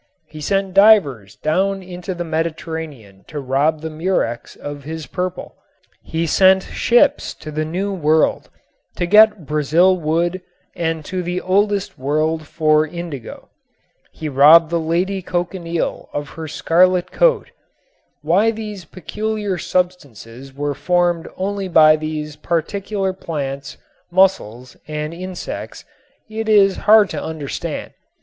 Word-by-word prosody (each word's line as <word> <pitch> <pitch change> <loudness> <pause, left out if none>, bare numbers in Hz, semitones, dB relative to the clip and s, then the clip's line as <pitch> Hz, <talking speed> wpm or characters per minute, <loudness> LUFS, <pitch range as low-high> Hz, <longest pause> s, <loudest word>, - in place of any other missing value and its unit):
He 155 0 -11
sent 195 +3 -1
divers 180 - +4
down 190 +5 -1
into 180 0 -6
the 175 - -3
Mediterranean 160 - -5
to 150 - -6
rob 145 +4 0
the 160 - -4
murex 155 -8 -2
of 145 -1 -8
his 160 +1 -6
purple. 180 +6 -5 0.5
He 165 +1 -3
sent 190 +3 +4
ships 280 +5 +2
to 155 - -9
the 155 +1 -2
new 190 +5 -3
world 160 -3 +1 0.5
to 175 - -1
get 210 -1 +5
Brazil 155 +5 +3
wood 170 +2 -1 0.3
and 165 -2 -2
to 185 -1 -3
the 180 +1 -3
oldest 200 -1 0
world 155 +3 -1
for 155 -1 +2
indigo. 165 -7 -8 0.6
He 155 - -6
robbed 155 +4 +6
the 170 - +1
lady 180 +4 -1
cochineal 175 -1 -3
of 145 0 -4
her 160 -1 -8
scarlet 180 +3 +2
coat. - - +2 0.7
Why 185 +8 +3
these 210 -5 -6
peculiar 205 +2 -4
substances 135 - -3
were 145 +2 -3
formed 175 +1 0
only 195 +1 -2
by 155 -3 +6
these 155 -1 -5
particular 190 +3 -2
plants, 140 -5 -5 0.3
mussels 130 - +1
and 150 +1 -4
insects 185 +1 -7 0.4
it 220 0 -4
is 200 -3 +5
hard 215 -2 +7
to - - -4
understand. 155 -3 -5
170 Hz, 130 wpm, -19 LUFS, 155-190 Hz, 0.7 s, hard